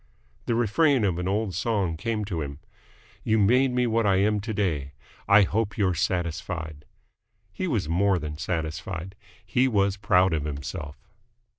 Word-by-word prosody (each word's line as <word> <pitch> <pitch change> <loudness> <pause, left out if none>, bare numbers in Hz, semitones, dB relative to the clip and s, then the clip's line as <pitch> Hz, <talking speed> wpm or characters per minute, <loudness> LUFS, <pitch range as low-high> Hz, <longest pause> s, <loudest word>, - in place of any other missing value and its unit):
The 115 - +1
refrain 125 +3 +3
of 90 -4 0
an 90 - -2
old 100 0 -1
song 95 -3 0
came 105 +5 -2
to 90 -6 -3
him. 70 -1 -5 0.7
"You 110 - +2
made 125 +6 +4
me 125 0 +1
what 115 -2 +1
I 95 - +4
am 105 +2 +2
to 110 +3 -5
day! 80 -10 -1 0.3
I 100 +1 +7
hope 100 +1 -1
you're 95 -3 +2
satisfied!" 85 -3 -3 0.7
He 185 - -3
was 115 - -1
more 95 +4 +2
than 75 -2 -6
satisfied. 80 +2 -4 0.3
He 125 +8 +2
was 100 -4 +1
proud 95 -3 +3
of 75 -3 -1
himself. 70 0 -6
95 Hz, 160 wpm, -26 LUFS, 80-110 Hz, 0.7 s, I